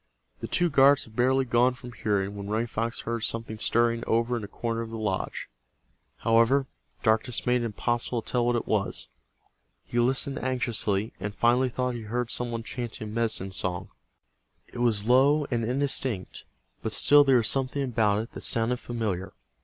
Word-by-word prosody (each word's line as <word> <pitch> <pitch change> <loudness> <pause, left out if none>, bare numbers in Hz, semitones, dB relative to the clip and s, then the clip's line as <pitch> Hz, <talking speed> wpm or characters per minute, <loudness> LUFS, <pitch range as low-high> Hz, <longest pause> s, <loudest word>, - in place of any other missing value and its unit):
The - - -5
two 175 -2 +2
guards 140 0 +5
had 110 - -15
barely 130 +2 +2
gone 120 +1 +3
from 125 -1 -10
hearing 100 -4 -1
when 100 0 -6
Running 110 +2 0
Fox 115 0 -2
heard 115 0 -3
something 115 -1 -2
stirring 115 +1 +2
over 115 +2 +1
in 115 - -4
a - - -5
corner 115 +2 -3
of 115 - -6
the 115 - -6
lodge. 105 -4 -3 0.7
However, 115 +4 +3 0.4
darkness 110 +1 +1
made 125 0 +2
it - - -2
impossible 120 +1 -2
to - - -7
tell 125 -1 +2
what 120 - +2
it 120 - -1
was. 100 - -1 0.8
He 120 - -2
listened 135 +3 +1
anxiously, 115 -5 -1
and 100 +2 -5
finally 125 +2 +3
thought 125 +1 -2
he 120 - -5
heard 120 0 -2
some 120 0 +1
one 115 -1 -4
chanting 115 -2 -5
a - - -8
medicine 110 -4 -1
song. 90 -2 -3 0.8
It 120 - -7
was 110 -3 +1
low 140 +4 +4
and 120 -2 0
indistinct, 125 -4 -1 0.4
but 110 - -3
still 145 +5 +6
there 135 -2 +4
was 115 - +1
something 135 +1 0
about 110 -4 +1
it 115 - -12
that - - -9
sounded 115 +2 0
familiar. 105 -7 -4
115 Hz, 185 wpm, -27 LUFS, 110-125 Hz, 0.8 s, still